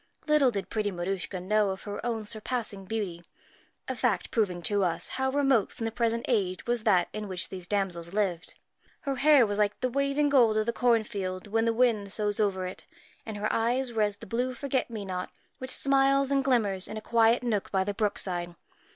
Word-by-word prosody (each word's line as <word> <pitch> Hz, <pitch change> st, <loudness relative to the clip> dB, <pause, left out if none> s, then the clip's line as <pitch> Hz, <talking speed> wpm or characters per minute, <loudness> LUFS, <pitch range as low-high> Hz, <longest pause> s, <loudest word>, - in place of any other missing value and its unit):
Little 300 Hz, -4 st, +4 dB
did 200 Hz, -4 st, -4 dB
pretty 215 Hz, -2 st, 0 dB
Maruschka 185 Hz, +1 st, -3 dB
know 205 Hz, +3 st, +2 dB
of 190 Hz, 0 st, -5 dB
her 205 Hz, -1 st, -6 dB
own 230 Hz, -3 st, -2 dB
surpassing 215 Hz, -2 st, -4 dB
beauty 190 Hz, -5 st, -4 dB, 0.6 s
a 260 Hz, -, -2 dB
fact 225 Hz, -8 st, 0 dB
proving 185 Hz, -6 st, 0 dB
to 200 Hz, +4 st, +2 dB
us 175 Hz, -3 st, -1 dB
how 265 Hz, 0 st, -1 dB
remote 270 Hz, -5 st, +2 dB
from 230 Hz, -, -5 dB
the 225 Hz, -, -1 dB
present 230 Hz, 0 st, 0 dB
age 190 Hz, -6 st, 0 dB
was 240 Hz, -2 st, 0 dB
that 185 Hz, -5 st, +4 dB
in 215 Hz, -1 st, -4 dB
which 185 Hz, -2 st, -3 dB
these 185 Hz, -2 st, -7 dB
damsels 180 Hz, -4 st, -1 dB
lived. 190 Hz, -4 st, -1 dB, 0.5 s
Her 275 Hz, -2 st, -2 dB
hair 290 Hz, -2 st, +6 dB
was 205 Hz, 0 st, -2 dB
like 210 Hz, -1 st, +1 dB
the 255 Hz, 0 st, -1 dB
waving 280 Hz, +2 st, +1 dB
gold 235 Hz, -6 st, +4 dB
of 215 Hz, -, +1 dB
the 235 Hz, -, 0 dB
cornfield 210 Hz, -6 st, 0 dB
when 225 Hz, +2 st, 0 dB
the 230 Hz, -, +3 dB
wind 225 Hz, -4 st, +1 dB
soughs 210 Hz, 0 st, 0 dB
over 195 Hz, -3 st, +1 dB
it, 185 Hz, -, -7 dB, 0.4 s
and 215 Hz, -2 st, -5 dB
her 210 Hz, +1 st, -1 dB
eyes 245 Hz, +2 st, 0 dB
were 220 Hz, -, 0 dB
as 205 Hz, -1 st, +1 dB
the 225 Hz, -, -10 dB
blue 250 Hz, +4 st, -2 dB
forget 265 Hz, 0 st, -1 dB
me 215 Hz, -3 st, -5 dB
not 185 Hz, -1 st, -4 dB, 0.3 s
which 260 Hz, -, -5 dB
smiles 275 Hz, 0 st, +3 dB
and 275 Hz, -1 st, +2 dB
glimmers 210 Hz, -8 st, +1 dB
in 215 Hz, -, -6 dB
a -, -, -2 dB
quiet 230 Hz, +2 st, +3 dB
nook 215 Hz, -5 st, -1 dB
by 190 Hz, -1 st, +2 dB
the 205 Hz, +1 st, -2 dB
brookside. 180 Hz, -5 st, -2 dB
215 Hz, 205 wpm, -28 LUFS, 195-245 Hz, 0.6 s, hair